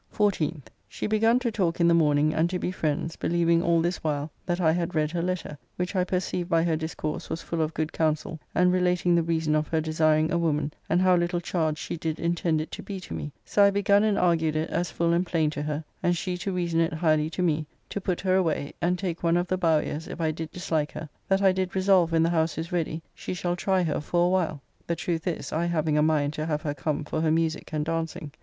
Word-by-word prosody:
14th. 170 - +1 0.3
She - - -5
begun 225 +2 +3
to 250 -2 -1
talk 180 -6 0
in 170 - +4
the 170 - +5
morning 150 -2 +3
and 165 +2 +2
to 185 - -1
be 180 - -2
friends, 160 -2 -2
believing 170 0 +2
all 170 -1 +3
this 175 +1 0
while 150 -1 -2 0.2
that. 175 0 0
I 160 -3 +4
had 170 0 -2
read 155 -1 +1
her 170 0 -1
letter, 175 -4 -3 0.2
which 180 +2 -3
I 185 - +3
perceive 180 -1 -2
by 165 -2 +3
her 165 -2 +1
discourse 155 -1 -4
was 165 - -4
full 165 -1 -2
of 155 0 -1
good 155 0 -2
counsel, 155 0 -1 0.2
and 180 +1 +4
relating 180 -1 +2
the 170 - +4
reason 160 -2 0
of 155 0 +1
her 160 - 0
desiring 155 0 +2
a 170 - +1
woman, 150 -3 0 0.2
and 175 +3 +3
how 185 -1 +5
little 175 0 0
charge 160 -3 -1
she - - -5
did 160 0 -3
intend 170 -1 0
it 155 - -7
to - - -6
be 195 -2 -6
to 180 - -8
me, 150 - -5
so 205 - +3
I 200 - +7
begun 200 +1 +3
and 215 -2 +2
argued 165 -3 +2
it 155 +1 -1
as 175 0 -1
full 170 +1 +1
and 170 +1 +2
plain 160 -4 0
to 145 - -4
her, 150 +1 -3 0.2
and 175 0 +2
she 180 +1 -2
to 195 - -2
reason 170 -2 0
it 165 0 +1
highly 155 -1 +2
to 180 +2 -2
me, 155 -3 0 0.2
to 200 - -4
put 180 -2 -2
her 185 -1 +2
away, 160 -6 0
and 180 +1 +1
take 175 -3 -3
one 170 0 +3
of 175 - +1
the 185 - 0
Bowyers 160 -2 0
if - - -7
I 160 -1 +1
did 160 0 -5
dislike 160 -4 -2
her, 155 - -6 0.2
that 195 0 +2
I 190 - +6
did 185 0 -2
resolve 185 -3 +4
when 165 -1 +3
the 165 - +2
house 160 -2 +1
is 165 +1 -4
ready 165 -2 -2
she - - -5
shall 175 0 -1
try 185 +1 +1
her 160 -3 -1
for 175 +3 +1
a - - +3
while; 170 -7 0 0.2
the 170 - 0
truth 165 0 -3
is, 175 - -3
I 165 +2 0
having 155 -3 0
a 150 - +4
mind 150 -2 +2
to 155 +1 -3
have 150 -1 -1
her 145 - -1
come 150 +1 -2
for 155 +2 -3
her 160 - +2
musique 160 0 0
and 150 -1 -1
dancing. 165 -2 -3
165 Hz, 255 wpm, -26 LUFS, 155-180 Hz, 0.3 s, I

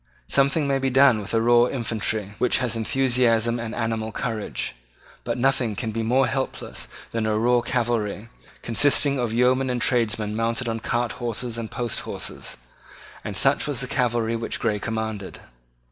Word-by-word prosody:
Something 140 +2 +2
may 135 -1 +1
be 135 0 0
done 130 -3 +5
with 100 - -7
a - - +4
raw 120 +1 +5
infantry 110 -4 -2
which 125 - +3
has 125 -2 0
enthusiasm 120 -1 +2
and 115 -1 -5
animal 115 -1 -2
courage: 110 -1 -3 0.5
but - - -2
nothing 125 -4 +1
can 115 -1 -3
be 115 +1 -2
more 125 +4 +3
helpless 135 0 -3 0.2
than 115 -1 -1
a 105 0 +1
raw 120 +2 +3
cavalry, 115 -3 -1 0.4
consisting 140 +3 +3
of 120 -2 -1
yeomen 130 +3 +2
and 125 -1 -1
tradesmen 110 -4 +1
mounted 115 +2 -1
on 115 0 -2
cart 120 +1 -1
horses 120 0 -4
and 110 -1 -5
post 120 -2 -3
horses; - - -6 0.7
and - - -3
such - - +3
was - - +1
the - - 0
cavalry 115 -2 0
which 115 0 -3
Grey 110 -3 0
commanded. 110 -2 -4
115 Hz, 165 wpm, -24 LUFS, 110-125 Hz, 0.7 s, done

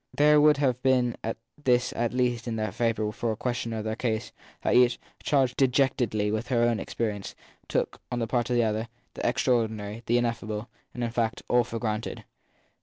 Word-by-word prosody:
There 150 0 +6
would 150 -1 +6
have 130 -3 +1
been 125 -3 +2 0.5
this 125 -2 +2
at 120 0 0
least 125 -1 0
in 115 - -2
their 110 -2 -2
favour 110 -1 0
for 115 +2 -2
a - - -2
questioner 120 -1 -2
of 110 - -3
their 110 0 -2
case, 110 -2 -2 0.3
that - - +2
each, 125 0 +5 0.2
charged 135 -4 +2
dejectedly 125 -6 +2
with 110 +3 -2
her 120 -2 +2
own 120 -2 +2
experience, 105 -4 -3 0.3
took, - - -1
on 120 - -1
the 115 - 0
part 120 +1 0
of 125 - +1
the 120 - +4
other, 110 +1 -1 0.3
the - - -7
extraordinary 110 -4 0
the 120 - +3
ineffable, 115 -2 -2 0.3
in 120 -1 -1
fact 115 -1 -1
all 120 0 +4
for 115 -1 -5
granted. 110 -1 -3
120 Hz, 185 wpm, -27 LUFS, 110-125 Hz, 0.5 s, There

